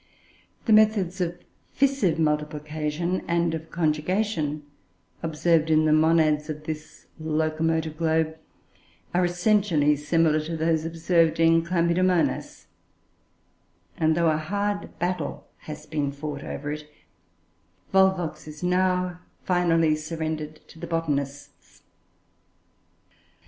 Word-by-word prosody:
The 225 - +4
methods 210 -4 +3
of 175 0 -1 0.4
fissive 265 - +2
multiplication 150 +2 -1
and 170 -1 +1
of 160 0 -5
conjugation 155 0 -1 0.6
observed 160 0 +1
in 155 0 +4
the 155 - +4
monads 155 -1 +3
of 150 0 -5
this 155 0 -7
locomotive 160 0 -1
globe 160 -1 +1 0.8
are 180 +1 +3
essentially 175 -4 +2
similar 155 +1 +2
to 160 +2 -4
those 160 0 +1
observed 165 0 +1
in 165 0 +4
Chlamydomonas; 170 0 +1 1.3
and, 160 - +2
though 170 -2 +3
a 155 - +1
hard 200 +6 -3
battle 175 -2 -3
has 150 0 -9
been 150 -2 -2
fought 140 0 -6
over 145 +1 -5
it, 150 0 -7 1.0
Volvox 190 -5 +2
is 150 +2 -9
now 180 0 +1 0.2
finally 165 -3 +2
surrendered 155 -1 -5
to 165 - -14
the - - -6
Botanists. 145 -4 -4
160 Hz, 105 wpm, -25 LUFS, 155-175 Hz, 1.3 s, The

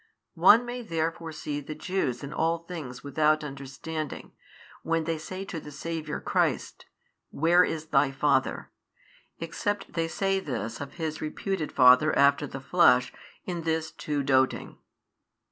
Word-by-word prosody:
One 220 +7 +7
may 245 +1 -5
therefore 165 -4 -3
see 150 -1 -4
the 150 +2 -7
Jews 155 -7 -2
in 140 - -6
all 165 +1 +1
things 160 -7 -8
without 155 +1 +2
understanding, 145 +2 -6 0.5
when 165 0 0
they 165 0 -2
say 185 +5 -6
to 175 -4 -5
the 150 - -10
Saviour 155 0 -4
Christ, - - -1 0.4
Where 170 +4 +4
is 160 -3 -3
Thy 135 -1 +4
Father? 135 -1 0 0.7
except 195 +4 -3
they 165 -1 0
say 195 +3 0
this 115 -7 -4
of 140 -1 -7
His 160 -2 -4
reputed 160 +2 -3
father 125 +5 +6
after 140 +1 +4
the 135 - -7
flesh, 135 -4 +4 0.3
in 175 -2 -3
this 160 -1 -1
too 145 -2 -3
doting. 130 -1 +1
155 Hz, 145 wpm, -27 LUFS, 140-170 Hz, 0.7 s, One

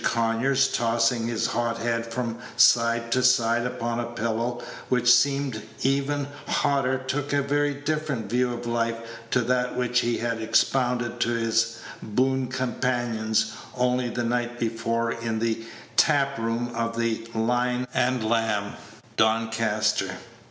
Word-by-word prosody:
Conyers, 120 +4 +2
tossing 115 0 +1
his 115 -2 -1
hot 115 -1 -1
head 115 0 -1
from 120 -1 -3 0.2
side 115 0 +4
to 130 - +3
side 120 -1 +3
upon 120 -1 -3
a 120 - -1
pillow 120 +1 -2 0.3
which 125 -1 +5
seemed 140 -5 +1 0.2
even 140 +1 +1 0.2
hotter, 135 -2 +1
took 135 +2 -3
a 145 -1 +2
very 145 +1 +1
different 145 -5 -2
view 125 +3 +1
of 120 0 -5
life 115 -1 0 0.3
to 125 - +2
that 125 +1 0
which 125 -1 +1
he 120 -1 0
had 115 -1 -2
expounded 120 +1 +1
to 120 - +1
his 115 0 +1 0.2
boon 130 +4 0
companions 120 -4 -1 0.3
only 125 0 +1
the 120 +1 -2
night 120 0 -1
before 115 0 -1
in 115 -1 -3
the 115 0 -1 0.3
tap 140 -4 +3
room 115 +1 -2
of 115 0 -2
the 115 -1 0
"Lion 125 +2 +1
and 125 -3 +1
Lamb," 110 -3 0 0.4
Doncaster. 110 -1 +1
120 Hz, 140 wpm, -25 LUFS, 115-125 Hz, 0.4 s, which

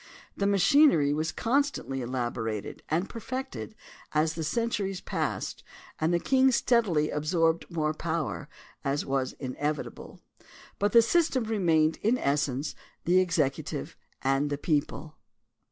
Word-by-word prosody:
The 200 - 0
machinery 200 - +5
was 155 +2 -1
constantly 255 - 0
elaborated 120 -4 -3
and 170 +5 0
perfected 255 -1 -6 0.4
as 155 +1 +2
the 165 - -4
centuries 200 +1 -1
passed - - -3 0.4
and 160 +2 +1
the 175 - +2
king 265 +6 +4
steadily 215 -12 +2
absorbed 165 +2 +1
more 155 -3 -1
power, 155 - -3 0.3
as 140 +1 -1
was 135 -1 -1
inevitable, 145 +3 -4 0.6
but 205 +1 +2
the 230 -1 +7
system 285 -1 +2
remained 165 -8 +2
in 230 +4 +1
essence 140 - 0 0.3
the 180 +2 +5
executive 150 - -1 0.3
and 135 +2 +2
the 145 - -2
people. 155 +1 -2
160 Hz, 120 wpm, -28 LUFS, 145-210 Hz, 0.6 s, the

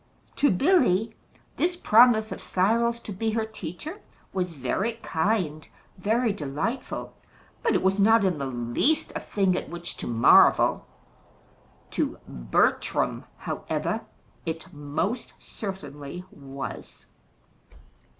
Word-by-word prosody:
To 285 - +4
Billy, 225 - +3 0.4
this 355 +1 +1
promise 225 -7 +5
of - - -5
Cyril's 230 +5 +1
to 215 - -7
be 220 +4 -1
her 225 -1 0
teacher 220 - -7 0.3
was 180 -2 -1
very 160 - -1
kind, 160 -3 0 0.3
very 220 +4 +1
delightful; 160 - -4 0.5
but 465 - +2
it - - +1
was 190 +1 +2
not 220 +1 +5
in 180 -5 +1
the 140 - -2
least 120 - 0
a - - -1
thing 190 -3 +1
at - - -4
which 170 0 -6
to - - -5
marvel. 115 -1 +5 1.0
To - - -1
Bertram, - - 0
however, - - -3 0.4
it 160 0 -5
most 150 - -3
certainly 160 -5 -7
was. 140 -2 -8
190 Hz, 115 wpm, -26 LUFS, 155-225 Hz, 1.0 s, promise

